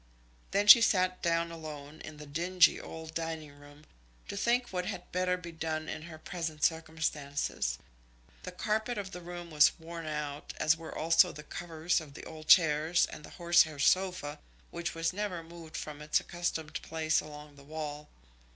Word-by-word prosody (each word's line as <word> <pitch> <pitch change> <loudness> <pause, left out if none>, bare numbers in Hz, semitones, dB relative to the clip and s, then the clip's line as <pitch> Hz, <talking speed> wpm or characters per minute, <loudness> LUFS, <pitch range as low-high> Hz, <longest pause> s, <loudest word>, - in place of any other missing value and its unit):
Then 200 +1 +1
she 230 +3 +11
sat 185 -4 +2
down 170 0 +1
alone 155 -2 -8
in 155 -1 -9
the 150 - -9
dingy 170 +5 +3
old 160 0 -8
dining 160 -2 -4
room, 145 +1 -16 0.4
to - - -4
think 240 +4 +1
what 180 -1 -2
had 180 - -6
better 180 0 +1
be 175 -1 -8
done 160 -1 -3
in 155 - -5
her 160 0 -9
present 160 -2 -5
circumstances. 150 - -1 0.6
The 180 - -7
carpet 220 +5 -1
of 195 -2 -4
the 180 - -7
room 175 -1 -8
was 150 -1 +5
worn 165 0 -8
out, 150 -1 -4
as 155 +1 +4
were 160 0 -8
also 165 +3 +5
the 150 - -10
covers 165 +2 -1
of 145 -3 -12
the - - -9
old 155 -1 -10
chairs 160 0 +5
and - - -10
the - - -10
horsehair 170 -3 +4
sofa 155 -1 +1 0.3
which 170 0 -4
was 165 +1 0
never 190 -4 -3
moved 165 -1 -10
from 150 -1 -6
its 150 0 +2
accustomed 175 -3 -3
place 160 -1 0
along 150 -1 -11
the 140 - -15
wall. 150 0 -6
160 Hz, 175 wpm, -31 LUFS, 150-175 Hz, 0.6 s, she